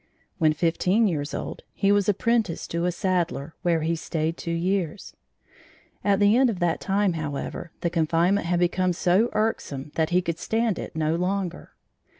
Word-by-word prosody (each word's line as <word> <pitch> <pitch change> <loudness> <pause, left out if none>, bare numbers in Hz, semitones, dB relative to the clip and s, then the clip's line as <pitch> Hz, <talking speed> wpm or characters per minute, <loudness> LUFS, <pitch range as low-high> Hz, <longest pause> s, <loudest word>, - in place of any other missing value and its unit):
When 155 -2 +4
fifteen 180 +7 +2
years 150 -5 -2
old, - - -5
he 195 - +2
was 205 -1 +3
apprenticed 220 -3 0
to 170 +1 -1
a 180 - +2
saddler, 175 -5 -1
where 170 -2 +1
he 165 +2 0
stayed 160 0 -2
two 170 - -7
years. 175 +1 -2 0.9
At 200 -1 +3
the 205 +1 +5
end 260 0 +4
of 215 - -2
that 175 -2 0
time, 195 -1 +1
however, 155 +1 -4
the 170 - 0
confinement 170 +3 +2
had 175 0 +1
become 180 +1 +1
so 185 +6 +2
irksome 150 -10 -2
that 160 -1 0
he 180 +1 +2
could 170 -1 -3
stand 225 -3 0
it - - -7
no 155 0 +1
longer. 180 0 -3
175 Hz, 170 wpm, -25 LUFS, 165-200 Hz, 0.9 s, the